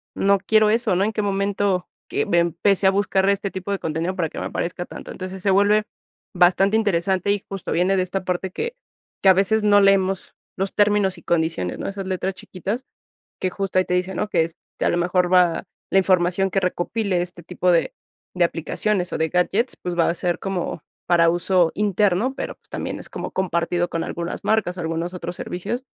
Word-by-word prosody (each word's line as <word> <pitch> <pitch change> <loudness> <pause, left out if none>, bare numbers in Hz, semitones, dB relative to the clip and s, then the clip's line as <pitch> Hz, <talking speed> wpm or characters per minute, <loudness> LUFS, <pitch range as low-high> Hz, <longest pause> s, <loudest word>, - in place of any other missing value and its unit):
no 200 0 +3
quiero 215 +2 +3
eso, 225 -3 +2
¿no? 190 - +2
En 215 - +1
qué 215 - -1
momento 200 -2 0 0.2
que - - 0
me 170 - +3
empecé 185 +3 +2
a - - +6
buscar 195 -1 +1
este 200 0 0
tipo 190 +1 -6
de 200 - -1
contenido 165 +4 -2
para 165 -4 -1
que - - -7
me - - -3
aparezca 175 +1 -3
tanto. - - -9
Entonces 185 0 -7
se 195 - +3
vuelve 205 +2 +4 0.5
bastante 190 +4 +4
interesante, 190 -2 +1
y 205 - -3
justo 195 -2 -5
viene 185 +3 +2
de 185 - +2
esta 190 +1 -3
parte 180 +1 -2
que- 470 - -4 0.5
que - - +4
a - - +9
veces 200 +3 +2
no 205 -1 +5
leemos 195 -1 +2 0.2
los 195 +1 -1
términos 205 -2 +3
y - - -15
condiciones, 160 - -1
¿no? - - -4
Esas 195 -1 -6
letras 190 0 -2
chiquitas 205 +10 -5 0.6
que 185 - 0
justo 195 0 -1
ahí 185 - +4
te 180 - 0
dicen, 180 +1 -1
¿no? 210 - -1
Que 165 - +2
es 165 0 -8 0.2
que - - +1
a - - +3
lo - - 0
mejor 180 +1 +1
va 180 -2 +4 0.3
la 195 - +5
información 185 0 +2
que 195 - 0
recopile 180 +1 -1
este 175 -1 -7
tipo 180 +1 0
de 170 - +1 0.4
de 180 -1 +3
aplicaciones 180 +3 -1
o - - -2
de 160 0 +1
gadgets, 200 +7 +1
pues, 180 -1 -5
va 165 - +4
a - - -1
ser 175 0 -1
como 185 -5 -3 0.2
para 170 -1 +4
uso 175 0 +2
interno, 210 +4 +1
pero, - - -5
pues, - - -26
también - - -4
es - - -6
como - - -5
compartido 175 -1 0
con 165 - -2
algunas 170 0 -5
marcas 210 -5 +1
o - - -3
algunos 165 +2 -3
otros 175 0 -5
servicios, 215 +8 -4
185 Hz, 210 wpm, -22 LUFS, 175-200 Hz, 0.6 s, a